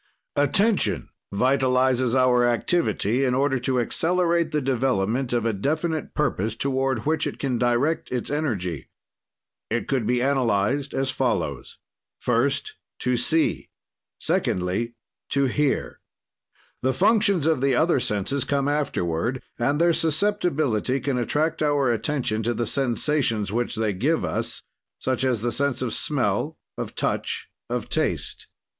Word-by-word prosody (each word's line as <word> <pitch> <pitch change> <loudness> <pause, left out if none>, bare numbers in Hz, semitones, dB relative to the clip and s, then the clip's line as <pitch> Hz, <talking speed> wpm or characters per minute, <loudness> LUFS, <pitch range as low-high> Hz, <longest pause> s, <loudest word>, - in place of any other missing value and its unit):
"Attention 195 +10 +2 0.2
vitalizes 130 +1 +2
our 125 -1 +4
activity 120 - +1
in 125 -2 +2
order 135 0 +1
to 125 +1 0
accelerate 170 +5 +1
the 150 - +1
development 125 -2 0
of 120 -2 0
a 115 - +1
definite 155 - -2
purpose 110 -7 0
toward 130 -2 -1
which 155 0 +1
it - - -5
can 130 -4 -1
direct 125 +7 +1
its 125 +1 -2
energy. 100 - -2 0.8
"It - - -1
could 130 -5 0
be 125 0 +2
analyzed 130 0 +1
as 135 -1 0
follows: 100 - -2 0.4
"First, 135 +4 0 0.2
to 125 0 +1
see; 155 +7 +1 0.5
"Secondly, 95 +7 -1 0.3
to 140 0 +2
hear. 145 +2 0 0.8
"The 130 0 +1
functions 200 -4 +3
of 160 -5 +2
the 135 -1 +3
other 160 +1 +3
senses 115 +5 0
come 140 -1 0
afterward, 125 - -1 0.2
and 145 +5 +1
their 170 0 +4
susceptibility 155 - +1
can 135 -3 -1
attract 150 +7 0
our 145 -4 +2
attention 115 -2 -1
to 120 +2 -1
the 120 - -1
sensations 120 -4 +1
which 120 +1 -1
they 110 -2 0
give 145 - 0
us, - - -3 0.3
such 130 0 -1
as 125 -5 +1
the 120 +1 0
sense 135 +1 0
of 115 -4 -2
smell, 145 +2 0 0.2
of - - -6
touch, - - -2 0.2
of - - -2
taste. - - -2
130 Hz, 135 wpm, -24 LUFS, 120-145 Hz, 0.8 s, our